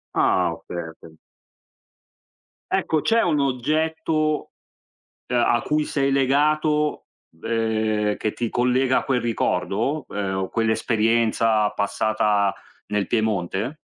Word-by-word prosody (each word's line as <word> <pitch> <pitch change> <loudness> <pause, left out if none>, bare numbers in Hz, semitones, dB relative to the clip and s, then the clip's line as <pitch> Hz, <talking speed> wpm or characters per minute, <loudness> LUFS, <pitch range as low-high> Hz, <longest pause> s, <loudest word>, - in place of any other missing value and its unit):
Ah, - - +2
okay, - - -10 0.3
okay. 80 -1 -13 1.6
Ecco, 155 -1 +1
c'è 230 +6 +2
un 155 -4 +1
oggetto, 155 +3 0 0.8
uhm, 125 - 0
a 120 0 +2
cui 150 +3 0
sei 140 -2 0
legato, 150 +3 +1 0.4
ehm, 110 -2 0
che 110 - -2
ti 120 -2 -3
collega 125 +1 +2
a - - 0
quel 125 -3 +1
ricordo, 115 +4 -1
ehm, 95 -2 -3
o 95 0 -2
quell'esperienza 110 -1 +1
passata 105 -1 +1 0.3
nel 105 -1 -1
Piemonte? 110 - -1
120 Hz, 110 wpm, -23 LUFS, 105-145 Hz, 1.6 s, Ah